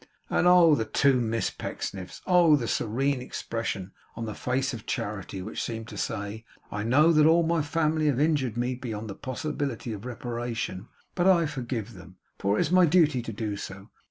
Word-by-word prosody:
And, -, -, +3 dB
oh, 175 Hz, -3 st, +7 dB
the 115 Hz, -6 st, +1 dB
two 135 Hz, +1 st, +3 dB
Miss 115 Hz, -1 st, -1 dB
Pecksniffs! 95 Hz, -2 st, -6 dB
Oh, 175 Hz, -4 st, +6 dB
the 120 Hz, -5 st, -2 dB
serene 130 Hz, +6 st, 0 dB
expression 115 Hz, -6 st, -4 dB, 0.2 s
on 115 Hz, -, -4 dB
the 110 Hz, -, -4 dB
face 130 Hz, +4 st, -1 dB
of 110 Hz, -3 st, -8 dB
Charity, 100 Hz, -2 st, -4 dB
which 110 Hz, -, -5 dB
seemed 115 Hz, -1 st, -4 dB
to 105 Hz, -, -9 dB
say, 100 Hz, +3 st, -4 dB, 0.3 s
'I 105 Hz, 0 st, -3 dB
know 150 Hz, +8 st, +5 dB
that 155 Hz, -1 st, +5 dB
all 165 Hz, +1 st, +5 dB
my 165 Hz, 0 st, +1 dB
family 155 Hz, +1 st, +1 dB
have 135 Hz, -3 st, +1 dB
injured 145 Hz, -7 st, +1 dB
me 125 Hz, +1 st, 0 dB
beyond 110 Hz, -4 st, -5 dB
the -, -, -5 dB
possibility 130 Hz, -2 st, -4 dB
of 105 Hz, -1 st, -8 dB
reparation, 120 Hz, -4 st, -4 dB, 0.3 s
but 180 Hz, 0 st, +1 dB
I 175 Hz, -3 st, +5 dB
forgive 120 Hz, -6 st, -4 dB
them, 90 Hz, -1 st, -13 dB, 0.2 s
for 100 Hz, +2 st, +1 dB
it -, -, +2 dB
is 155 Hz, -, 0 dB
my 180 Hz, -1 st, +6 dB
duty 155 Hz, -5 st, +4 dB
so -, -, -13 dB
to 115 Hz, -, -5 dB, 0.5 s
do! -, -, -25 dB
125 Hz, 190 wpm, -27 LUFS, 110-150 Hz, 0.5 s, oh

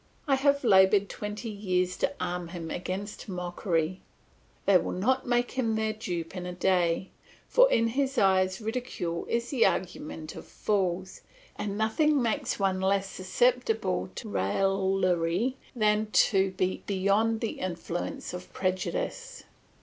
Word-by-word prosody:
I 275 Hz, -, +3 dB
have 280 Hz, +1 st, +3 dB
laboured 195 Hz, -2 st, +5 dB
twenty 210 Hz, +2 st, -5 dB
years 185 Hz, -3 st, 0 dB
to -, -, +1 dB
arm 180 Hz, -1 st, -3 dB
him 165 Hz, -2 st, -6 dB
against 195 Hz, +4 st, -5 dB
mockery; 180 Hz, -1 st, -2 dB, 0.6 s
they 195 Hz, -2 st, +6 dB
will -, -, -3 dB
not 255 Hz, +9 st, +1 dB
make 245 Hz, 0 st, +1 dB
him 230 Hz, -4 st, 0 dB
their 220 Hz, 0 st, 0 dB
dupe 175 Hz, -6 st, -5 dB
in 180 Hz, -1 st, -5 dB
a 180 Hz, -, -5 dB
day; 180 Hz, 0 st, +1 dB, 0.4 s
for -, -, +5 dB
in 230 Hz, -, +3 dB
his 270 Hz, +2 st, -1 dB
eyes 190 Hz, -1 st, +3 dB
ridicule 220 Hz, -7 st, -3 dB
is 235 Hz, +1 st, -1 dB
the 260 Hz, -5 st, +3 dB
argument 160 Hz, -3 st, -4 dB
of -, -, -9 dB
fools, 185 Hz, -3 st, -1 dB, 0.3 s
and 205 Hz, -1 st, -3 dB
nothing 285 Hz, +8 st, +2 dB
makes 230 Hz, -3 st, 0 dB
one 190 Hz, -2 st, +1 dB
less 195 Hz, 0 st, +1 dB
susceptible 220 Hz, -, +1 dB
to -, -, -6 dB
raillery 190 Hz, -, +1 dB, 0.2 s
than 215 Hz, -1 st, +2 dB
to 195 Hz, -1 st, +4 dB
be 185 Hz, 0 st, -1 dB
beyond 200 Hz, +3 st, +2 dB
the 225 Hz, -, -3 dB
influence 175 Hz, -1 st, -4 dB
of 180 Hz, 0 st, -8 dB
prejudice. -, -, -3 dB
195 Hz, 140 wpm, -28 LUFS, 180-225 Hz, 0.6 s, they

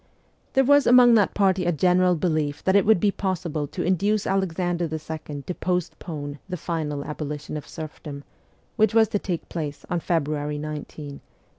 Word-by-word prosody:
There 270 Hz, -, +4 dB
was 285 Hz, +1 st, +5 dB
among 245 Hz, -1 st, +7 dB
that 210 Hz, -4 st, +3 dB
party 190 Hz, -2 st, +2 dB
a 175 Hz, -, +2 dB
general 180 Hz, +2 st, +3 dB
belief 155 Hz, -4 st, -1 dB
that 190 Hz, -, +2 dB
it 200 Hz, 0 st, +4 dB
would 220 Hz, -4 st, +5 dB
be 200 Hz, +3 st, +3 dB
possible 170 Hz, -7 st, -2 dB
to -, -, -4 dB
induce 200 Hz, +4 st, +1 dB
Alexander 175 Hz, -3 st, 0 dB
II. 155 Hz, -2 st, -6 dB
to 180 Hz, -, -4 dB
postpone 160 Hz, -5 st, -3 dB
the 180 Hz, -, -3 dB
final 150 Hz, -4 st, -3 dB
abolition 150 Hz, 0 st, -5 dB
of 150 Hz, -, -6 dB
serfdom, 150 Hz, -2 st, -8 dB, 0.5 s
which 220 Hz, -1 st, +3 dB
was 220 Hz, -2 st, +5 dB
to 205 Hz, -, 0 dB
take 175 Hz, -4 st, -4 dB
place 150 Hz, -4 st, -5 dB
on 175 Hz, -, +1 dB
February 150 Hz, -3 st, -1 dB
19, 155 Hz, +1 st, -4 dB
1863. 145 Hz, -1 st, -8 dB
170 Hz, 170 wpm, -24 LUFS, 150-190 Hz, 0.5 s, among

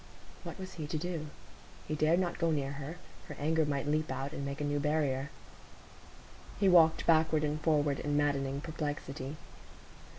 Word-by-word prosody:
What -, -, -7 dB
was 185 Hz, 0 st, -7 dB
he 155 Hz, -3 st, -5 dB
to 155 Hz, -, -2 dB
do? 165 Hz, -1 st, -3 dB, 0.6 s
He 155 Hz, -, -2 dB
dared 155 Hz, +3 st, +3 dB
not 175 Hz, -2 st, -1 dB
go 165 Hz, -1 st, +2 dB
near 140 Hz, -3 st, 0 dB
her; 140 Hz, +3 st, -6 dB, 0.3 s
her -, -, -7 dB
anger 160 Hz, +1 st, +1 dB
might 140 Hz, -1 st, -1 dB
leap 155 Hz, +1 st, 0 dB
out, 135 Hz, +1 st, -3 dB
and 140 Hz, -, -4 dB
make 140 Hz, +1 st, -4 dB
a -, -, -2 dB
new 145 Hz, 0 st, 0 dB
barrier. 145 Hz, -2 st, 0 dB, 1.3 s
He 200 Hz, -, +4 dB
walked 165 Hz, -3 st, +6 dB
backward 160 Hz, -1 st, +4 dB
and 150 Hz, +1 st, -1 dB
forward 150 Hz, -3 st, +2 dB
in 145 Hz, 0 st, 0 dB
maddening 140 Hz, -1 st, 0 dB
perplexity. 145 Hz, -3 st, -4 dB
150 Hz, 170 wpm, -32 LUFS, 145-160 Hz, 1.3 s, walked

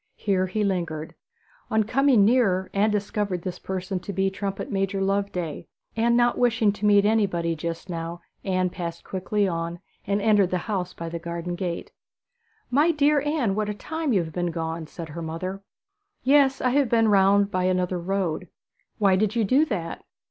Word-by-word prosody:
Here 190 Hz, -2 st, 0 dB
he 210 Hz, +3 st, -1 dB
lingered. 170 Hz, -5 st, -2 dB, 0.6 s
On 220 Hz, 0 st, +2 dB
coming 250 Hz, -1 st, +4 dB
nearer 200 Hz, -6 st, +2 dB
Anne 205 Hz, +2 st, +3 dB
discovered 205 Hz, -3 st, -2 dB
this 180 Hz, -1 st, -5 dB
person 190 Hz, 0 st, -3 dB
to 185 Hz, -, -6 dB
be 190 Hz, 0 st, 0 dB
Trumpet 195 Hz, 0 st, -4 dB
major 195 Hz, 0 st, -1 dB
Loveday; 195 Hz, -5 st, -2 dB, 0.3 s
and 235 Hz, +1 st, +3 dB
not 240 Hz, 0 st, +2 dB
wishing 230 Hz, -4 st, +3 dB
to 205 Hz, +1 st, -2 dB
meet 205 Hz, -1 st, +5 dB
anybody 190 Hz, -6 st, +1 dB
just 165 Hz, +3 st, -5 dB
now 170 Hz, -1 st, -5 dB, 0.2 s
Anne 185 Hz, -2 st, 0 dB
passed 170 Hz, -2 st, -5 dB
quickly 195 Hz, +2 st, -1 dB
on, 170 Hz, -1 st, -3 dB, 0.3 s
and 200 Hz, +1 st, +1 dB
entered 205 Hz, -3 st, +3 dB
the 185 Hz, -, 0 dB
house 190 Hz, -5 st, -3 dB
by 165 Hz, -, -6 dB
the 165 Hz, 0 st, -4 dB
garden 170 Hz, +1 st, -4 dB
door. 175 Hz, -1 st, -3 dB, 0.9 s
'My 295 Hz, +6 st, +4 dB
dear 295 Hz, -2 st, +3 dB
Anne, 295 Hz, -9 st, 0 dB
what 210 Hz, +1 st, -1 dB
a 210 Hz, -, -3 dB
time 315 Hz, +5 st, -3 dB
you 195 Hz, -6 st, +3 dB
have 160 Hz, -1 st, -8 dB
been 175 Hz, -1 st, -1 dB
gone!' 165 Hz, -1 st, -4 dB
said 165 Hz, +1 st, -8 dB
her 170 Hz, +3 st, -6 dB
mother. 185 Hz, +4 st, -4 dB, 0.6 s
'Yes, 270 Hz, 0 st, +4 dB
I 255 Hz, -, +2 dB
have 275 Hz, -2 st, +2 dB
been 225 Hz, -1 st, +3 dB
round 200 Hz, 0 st, +4 dB
by 185 Hz, 0 st, 0 dB
another 180 Hz, -1 st, 0 dB
road.' 180 Hz, -1 st, -2 dB, 0.5 s
'Why 195 Hz, -3 st, +4 dB
did 215 Hz, +3 st, +1 dB
you 230 Hz, -, +2 dB
do 265 Hz, +9 st, +4 dB
that?' 180 Hz, -, -4 dB
195 Hz, 180 wpm, -25 LUFS, 175-215 Hz, 0.9 s, meet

